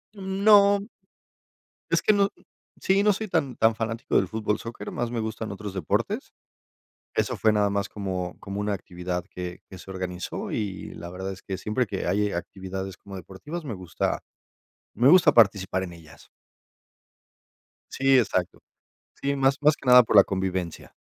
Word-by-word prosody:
No. 200 +1 +4 1.0
Es - - +3
que 215 - +4
no 200 -1 +3 0.5
sí, 195 +1 +3
no 210 0 +5
soy 215 +3 -4
tan, 150 - 0
tan 110 0 +3
fanático 115 +1 -3
del - - +4
fútbol 110 -1 -1
soccer, 115 0 -7
más 120 -1 -3
me 120 - -2
gustan 110 0 -4
otros 100 0 -6
deportes. 95 -5 -2 0.8
Eso - - 0
fue 110 - +3
nada 105 -1 +2
más 100 +1 -1
como 95 -4 -4
como 100 0 -5
una 105 0 -1
actividad 90 -1 -5
que 90 -2 -7
que 95 - -11
se 95 - -11
organizó. 90 -1 -5
Y, 100 -3 -4
la 85 - -8
verdad 95 +2 -5
es 95 - -11
que 95 - -4
siempre 115 +4 -1
que - - -4
hay 105 0 +1
actividades 95 +1 -5
como 100 0 -10
deportivas, 145 - -8
me 125 -7 -4
gusta 90 -3 -2 0.7
me 125 - +4
gusta 170 -2 +7
participar 100 -5 +3
en 90 - -8
ellas. 80 -3 -15 1.6
Sí, 135 0 +4
exacto. 95 -7 0 0.6
Sí, 140 0 0
más 135 0 +2
más 150 +1 +5
que 135 - -12
nada 125 0 +9
por 110 - -1
la 100 - +10
convivencia. 95 -3 -3
105 Hz, 165 wpm, -26 LUFS, 95-135 Hz, 1.6 s, la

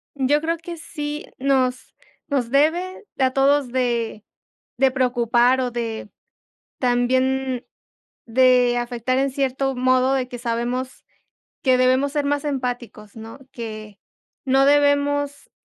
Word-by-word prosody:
Yo 280 +2 +2
creo 330 +2 -1
que 340 +1 -8
sí 295 -2 -6
nos 260 -2 0 0.3
nos 260 -5 -1
debe 335 - +1
a 260 -1 +3
todos 275 0 +3
de 235 -4 -1 0.5
de 265 +1 +3
preocupar 245 0 +2
o 250 -1 -2
de 230 -3 -4 0.7
también 255 +1 0 0.6
de 250 0 +4
afectar 240 +1 -1
en 275 0 +1
cierto 270 0 -1
modo 255 +1 +2
de 255 -2 -1
que 245 - -7
sabemos 240 +2 -3 0.6
que 260 -2 +4
debemos 255 +2 +2
ser 295 -1 -1
más 285 0 -1
empáticos, 245 -6 -4
¿no? 225 +2 -10
Que 215 -3 -8 0.5
no 270 +1 +4
debemos 285 0 +2
260 Hz, 125 wpm, -22 LUFS, 245-280 Hz, 0.7 s, de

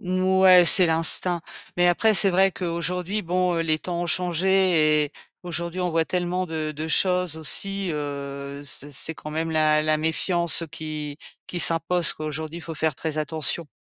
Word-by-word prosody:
ouais, 185 0 +4
c'est 180 +1 +7
l'instinct. 165 +2 +3 0.4
Mais 175 - +3
après, 215 +5 +2
c'est 195 0 +5
vrai 190 +2 +3
qu'aujourd'hui, 180 +3 -3
bon, 180 +1 0
heu, - - 0
les 155 -1 0
temps 175 0 -5
ont 175 - -3
changé 175 -3 +2
et 145 - -9 0.3
aujourd'hui, 170 0 -5
on 180 -1 -1
voit 165 0 +1
tellement 180 0 -2
de 155 -2 -4
de 155 +2 -5
choses 180 -1 +1
aussi, 195 +4 -2
heu, 140 -1 -6
ce 145 0 -8
c'est 155 +3 -1
quand 150 - -9
même 160 +1 -3
la 155 -1 +2
la 155 0 +1
méfiance 170 +1 +1
qui 150 -2 -6 0.3
qui 175 - -3
s'impose, 165 +1 +3
quoi. 155 - -8
Aujourd'hui, 155 +2 -5
il - - -10
faut 165 - -7
faire 155 -1 -1
très 155 -1 -4
attention. 155 +2 -2
165 Hz, 180 wpm, -23 LUFS, 155-180 Hz, 0.4 s, c'est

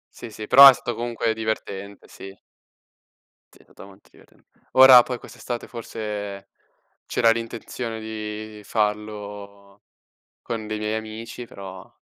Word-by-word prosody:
Sì, 120 - -9
sì, 110 0 -8
però 140 +4 +10
è 135 - +6
stato 120 -1 -5
comunque 115 -1 -2
divertente, 100 -3 -5
sì. 95 0 -12 1.2
Sì, - - -21
è - - -23
stato - - -15
molto 100 0 -19
divertent - - -23 0.3
ora 130 -2 +9
poi 125 -2 -5
quest'estate 120 -1 -7
forse 105 -4 -6 0.6
c'era 115 -1 +3
l'intenzione 115 0 -5
di 110 -1 -7
farlo 105 -2 -4 0.6
con 110 -2 -5
dei 110 - -3
miei 105 +1 -2
amici, 110 +2 -8
però 95 -3 -11
110 Hz, 130 wpm, -23 LUFS, 105-115 Hz, 1.2 s, però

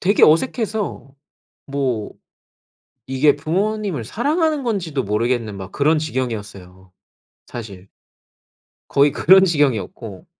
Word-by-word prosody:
되게 200 +3 +2
어색해서 210 - +1 0.6
뭐 130 -6 -2 0.9
이게 135 +3 +3
부모님을 190 - -2
사랑하는 300 - 0
건지도 175 - -2
모르겠는 110 0 -1
막 95 0 -9
그런 155 +2 +2
지경이었어요, 105 - -5 0.5
사실. 100 -5 -9 1.0
거의 140 +1 +3
그런 190 +4 +6
지경이었고 125 - -1
140 Hz, 255 characters per minute, -20 LUFS, -, 1.0 s, 그런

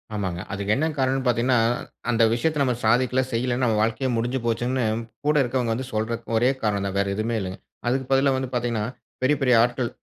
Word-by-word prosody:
ஆமாங்க. 95 -4 -2
அதுக்கு 100 +1 0
என்ன 155 +4 +1
காரணம்னு 135 0 +1
பாத்தீங்கனா, 125 +1 +2 0.5
"அந்த 115 -1 +3
விஷயத்த 150 +5 0
நம்ம 125 -2 +1
சாதிக்கல, 125 +3 +3
செய்யலனு 120 +2 0
நம்ம 110 -3 +2
வாழ்க்கையே 115 +4 0
முடிஞ்சுப்போச்சுனு 120 +1 -1 0.4
கூட 150 +1 +3
இருக்குறவங்க 120 -2 0
வந்து 130 +2 -4
சொல்றது 115 +2 -2
ஒரே 120 +3 +4
காரணம் 100 -2 0
தான்," 100 0 -3
வேற 100 - +1
எதுவுமே 110 +3 -1
இல்லங்க. 95 0 -5 0.3
அதுக்கு 130 +1 0
பதிலா 135 0 +4
வந்து 130 -1 -3
பாத்தீங்கனா 120 -3 -1 0.4
பெரிய, 145 +3 +4
பெரிய 125 -2 +4
ஆட்கள் 120 0 -1
120 Hz, 180 wpm, -24 LUFS, 110-130 Hz, 0.5 s, ஒரே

